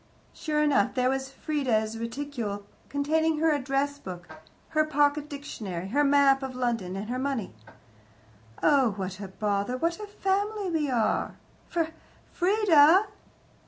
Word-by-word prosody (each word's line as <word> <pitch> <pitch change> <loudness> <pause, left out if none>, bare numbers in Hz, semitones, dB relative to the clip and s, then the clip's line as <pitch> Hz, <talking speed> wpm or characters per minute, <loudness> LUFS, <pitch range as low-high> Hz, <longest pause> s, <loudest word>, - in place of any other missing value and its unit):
Sure 300 -1 -1
enough, 275 -9 +2
there 255 0 +2
was 270 0 -2
Frieda's 250 -7 -1
reticule, 230 -3 -4 0.2
containing 315 +3 +1
her 320 +1 +3
address 285 +1 -1
book, 180 -6 -8 0.4
her 310 -1 +2
pocket 295 -1 +1
dictionary, 200 - -6
her 285 +7 +2
map 280 -1 +4
of 265 -1 -5
London, 230 -7 -2
and 200 +2 -5
her 250 +2 -3
money. 260 - -2 1.1
"Oh, 270 -7 +4
what 190 -1 -5
a 200 - -6
bother 205 +4 -1
what 335 +6 -1
a 420 - -6
family 405 0 -1
we 305 -3 0
are! 230 -4 0 0.3
Fr 340 -1 +1 0.5
Frieda!" 370 -1 +5
275 Hz, 135 wpm, -27 LUFS, 225-305 Hz, 1.1 s, Frieda